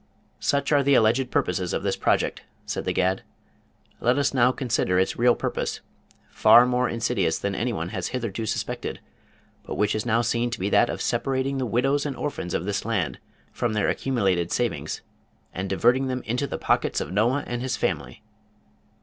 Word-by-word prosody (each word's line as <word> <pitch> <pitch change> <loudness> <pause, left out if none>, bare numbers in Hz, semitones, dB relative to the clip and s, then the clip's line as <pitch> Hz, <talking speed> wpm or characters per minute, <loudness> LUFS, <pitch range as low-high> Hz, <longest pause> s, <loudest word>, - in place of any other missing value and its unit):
"Such 140 +1 0
are 145 -1 +5
the 140 0 +4
alleged 120 +3 +3
purposes 90 -4 -1
of - - -2
this - - 0
project," - - 0 0.2
said - - -4
The - - 0
Gad. 95 +1 +1 0.8
"Let 125 +3 +2
us 140 -1 +1
now 125 -1 +4
consider 120 -8 0
its 95 - +1
real 120 0 +5
purpose, - - -3 0.5
far 120 - +7
more 125 0 +1
insidious 110 -7 0
than 100 - -2
any 120 +5 -1
one 85 -6 -3
has 95 -1 -3
hitherto 115 -3 -3
suspected, - - -3 0.6
but - - -6
which 105 0 +1
is 110 - -1
now 115 0 +2
seen 120 +1 0
to 120 - -5
be 100 +2 -1
that - - +4
of - - -3
separating 135 0 -1
the 130 - -1
widows 135 +6 +1
and 140 - -4
orphans 115 -12 -3
of 85 - -2
this 100 0 -2
land 110 -6 -1 0.3
from 120 -3 -1
their 105 -1 +1
accumulated 95 -10 0
savings, 75 - -2 0.5
and 95 +1 -4
diverting 125 +7 +3
them 130 -1 -3
into 125 +5 -1
the - - -4
pockets - - +1
of - - -4
Noah 120 +8 +2
and 120 0 -4
his 130 -1 -2
family!" - - -3
120 Hz, 185 wpm, -25 LUFS, 100-130 Hz, 0.8 s, far